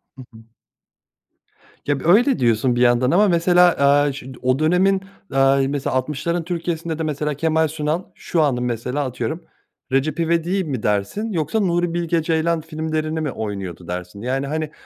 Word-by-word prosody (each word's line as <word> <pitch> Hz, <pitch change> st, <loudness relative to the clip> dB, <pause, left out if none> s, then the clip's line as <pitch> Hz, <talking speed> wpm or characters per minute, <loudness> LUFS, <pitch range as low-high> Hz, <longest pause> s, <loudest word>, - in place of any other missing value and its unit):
Hı 135 Hz, -, -11 dB
hı. 110 Hz, 0 st, -14 dB, 1.4 s
Ya, 145 Hz, -2 st, 0 dB
böyle 225 Hz, -, +4 dB
diyorsun 120 Hz, +1 st, +2 dB
bir 120 Hz, -, 0 dB
yandan 125 Hz, +1 st, +3 dB
ama 205 Hz, +4 st, +4 dB
mesela, 180 Hz, 0 st, +4 dB
aaa, 140 Hz, +1 st, +4 dB
ş 135 Hz, -1 st, -9 dB
o 130 Hz, +1 st, +1 dB
dönemin, 185 Hz, +5 st, +3 dB, 0.3 s
aaa, 135 Hz, 0 st, +4 dB
mesela 140 Hz, -1 st, -2 dB
60'ların 150 Hz, +6 st, -1 dB
Türkiye'sinde 165 Hz, -1 st, -3 dB
de -, -, -1 dB
mesela 150 Hz, -1 st, -2 dB
Kemal 160 Hz, +2 st, +1 dB
Sunal 155 Hz, +3 st, -2 dB
şu 165 Hz, -, -1 dB
anın 130 Hz, -5 st, +1 dB
mesela 125 Hz, +4 st, -2 dB
atıyorum 150 Hz, +6 st, -4 dB, 0.5 s
Recep 135 Hz, +4 st, 0 dB
İvedik'i 170 Hz, +3 st, +1 dB
mi 135 Hz, -9 st, -4 dB
dersin 105 Hz, -, -1 dB
yoksa 165 Hz, +3 st, -1 dB
Nuri 175 Hz, -3 st, 0 dB
Bilge 170 Hz, -1 st, 0 dB
Ceylan 160 Hz, 0 st, 0 dB
filmlerini 155 Hz, 0 st, -3 dB
mi 150 Hz, -3 st, -2 dB
oynuyordu 95 Hz, -6 st, -6 dB
dersin? 90 Hz, +3 st, -6 dB
Yani, 135 Hz, +3 st, -2 dB
hani, 155 Hz, +1 st, -3 dB
155 Hz, 160 wpm, -21 LUFS, 130-170 Hz, 1.4 s, böyle